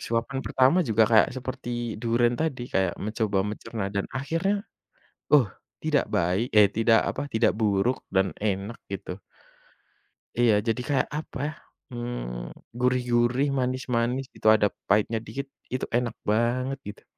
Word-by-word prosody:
Suapan 115 +4 -2
pertama 130 +7 +4
juga 110 0 +5
kayak 110 -2 +6
seperti 120 -2 -4
durian 120 +1 +2
tadi 155 -6 -1
kayak 95 -2 +1
mencoba 110 -2 0
mencerna 105 0 -4
dan 100 -1 -1
akhirnya, 165 +10 -1 0.7
uh, 130 -9 +6 0.3
tidak 155 -2 +2
baik, 90 +7 +1
eh, 105 -1 +7
tidak 115 +2 +4
apa - - -3
tidak 110 -1 +3
buruk 105 +3 +2
dan 95 0 +2
enak 100 +2 -2
gitu. 95 -2 -5 1.2
Iya 120 -3 +5
jadi 115 +2 0
kayak 135 -3 +1
apa 155 - -7
ya, 155 - -3 0.4
mmm, 120 - -6
gurih 125 0 +2
gurih 120 +4 +3
manis 130 0 -1
manis 120 +3 +1
gitu - - -6
ada 105 -1 +3 0.2
pahitnya 105 +3 +2
dikit 135 +6 -5 0.3
itu 130 - -1
enak 120 -2 -2 0.2
banget 125 +5 +1
gitu. 105 - -9
120 Hz, 145 wpm, -26 LUFS, 105-130 Hz, 1.2 s, eh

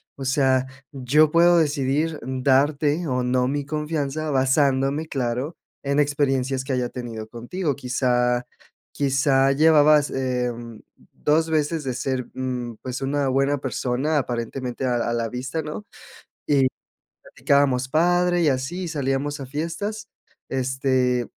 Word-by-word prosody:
o 135 - -7
sea, 130 -1 +2 0.2
yo 145 +3 +3
puedo 170 +1 +5
decidir 150 0 0
darte 140 +5 +1
o 125 -2 0
no 125 0 +1
mi 145 +1 -2
confianza, 155 0 -3
basándome, 135 +2 +1
claro, 130 +3 -3 0.3
en 140 +1 0
experiencias 135 -2 +1
que 130 0 -3
haya 125 -1 -1
tenido 115 -3 -7
contigo, 140 +7 -3
quizá, 125 -2 0 0.5
quizá 135 -1 +2
llevabas, 150 -1 +5
em, 125 -3 -3 0.3
dos 160 +2 +1
veces 155 0 0
de 130 -2 -2
ser 130 0 -2
mm, 125 -2 -4
pues, 130 +1 -5
una 140 +1 0
buena 135 +2 +1
persona 135 +3 -1
aparentemente 125 0 -3
a 125 -1 +1
a - - -1
la 115 -1 -1
vista, 130 +7 -4
¿no? 155 +7 -7 0.6
Y 140 -3 +4 0.6
platicábamos, 135 -2 +1
padre, 175 +3 +2
y 160 - +3
así, 145 +7 -2
salíamos 145 -1 -2
a 135 - -6
fiestas, 170 - -4 0.4
este, 130 -2 0
135 Hz, 130 wpm, -23 LUFS, 130-150 Hz, 0.6 s, puedo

